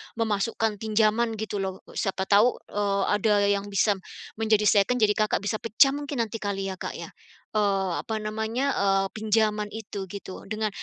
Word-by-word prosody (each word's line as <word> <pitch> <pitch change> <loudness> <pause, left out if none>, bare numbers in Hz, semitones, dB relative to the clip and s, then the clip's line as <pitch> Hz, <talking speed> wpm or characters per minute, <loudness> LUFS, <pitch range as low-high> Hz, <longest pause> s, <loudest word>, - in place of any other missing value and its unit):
memasukkan 220 -1 -1
pinjaman 220 +1 +2
gitu 215 -1 -4
loh. 190 -1 -4
Siapa 195 -2 -2
tahu, 210 +5 +5 0.2
eee, 200 -1 0
ada 210 +1 +2 0.2
yang 200 0 0
bisa 200 0 +2 0.4
menjadi 215 -1 +3
second, 215 +4 +3
jadi 210 -1 +5
Kakak 215 -2 +1
bisa 215 +2 -1
pecah 230 +5 +4
mungkin 285 -3 -2
nanti 225 0 -6
kali 195 -2 -2
ya, 185 - -8
Kak, - - -5
ya? - - -8 0.4
Eee, 195 -3 +1
apa 220 -2 -3
namanya, 220 +6 -1
eee, 195 -1 +2
pinjaman 215 -1 +1
itu 205 -3 -6
gitu, 190 0 -9
dengan 215 +1 -2
215 Hz, 165 wpm, -26 LUFS, 200-220 Hz, 0.4 s, tahu